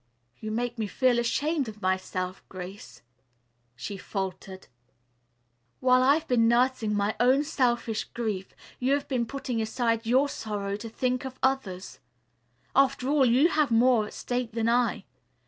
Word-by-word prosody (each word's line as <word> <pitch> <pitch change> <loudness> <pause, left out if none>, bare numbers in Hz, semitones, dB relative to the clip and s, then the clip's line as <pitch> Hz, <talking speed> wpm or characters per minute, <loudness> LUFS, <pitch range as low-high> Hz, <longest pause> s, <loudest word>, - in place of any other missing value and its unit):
"You 215 - -5
make 240 +2 -2
me 215 - -1
feel 250 +3 +2
ashamed 285 +4 0
of 215 -1 -11
myself, 185 -1 -2
Grace," 180 - -9 0.7
she 200 - -6
faltered. 190 -1 -5 1.1
"While 255 0 +4
I've 285 +5 +3
been 230 -2 +3
nursing 235 -2 +2
my 205 +1 0
own 260 +4 +4
selfish 240 -7 0
grief 215 -5 -4 0.2
you 260 +2 +2
have 285 - -1
been 245 -4 -1
putting 250 -2 -3
aside 230 0 -1
your 260 +4 +4
sorrow 205 -6 -4
to 225 +2 -7
think 250 +2 -1
of 260 -1 -7
others. 225 -9 -1 0.8
After 270 -1 +3
all, 285 -3 +4
you 260 +8 +4
have 305 -4 +2
more 230 -1 +4
at - - -11
stake 245 -2 -3
than 230 0 0
I. 240 0 +1
235 Hz, 145 wpm, -27 LUFS, 210-260 Hz, 1.1 s, While